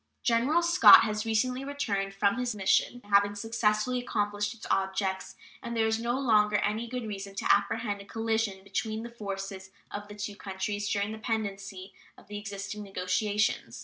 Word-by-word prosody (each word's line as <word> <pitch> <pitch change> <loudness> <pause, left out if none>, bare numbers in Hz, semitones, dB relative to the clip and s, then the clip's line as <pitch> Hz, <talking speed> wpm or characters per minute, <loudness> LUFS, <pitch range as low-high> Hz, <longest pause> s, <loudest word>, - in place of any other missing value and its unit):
General 260 +9 +2
Scott 340 - +9
has 215 0 -2
recently 250 +4 0
returned 210 -9 -2
from 200 +4 +2
his 245 -3 -1
mission, 210 +5 +1
having 200 0 +3
successfully 225 +2 0
accomplished 205 -2 -2
its 225 - -11
objects, 190 0 -1 0.3
and 235 0 -5
there 225 - +3
is 220 0 +1
no 240 +3 -1
longer 210 -5 +3
any 215 +3 0
good 250 0 -4
reason 200 -2 -6
to - - +3
apprehend 205 0 -1
a - - -12
collision 220 -3 -1
between 215 +3 -3
the 235 - -7
forces 195 -3 -6 0.2
of 205 0 -6
the 205 - -10
two 210 0 -5
countries 205 +1 -4
during 205 +1 0
the 220 - -7
pendency 200 -4 -4 0.2
of - - -17
the 205 0 -5
existing 200 0 -6
negotiations. 200 +2 -1
210 Hz, 170 wpm, -29 LUFS, 200-225 Hz, 0.3 s, Scott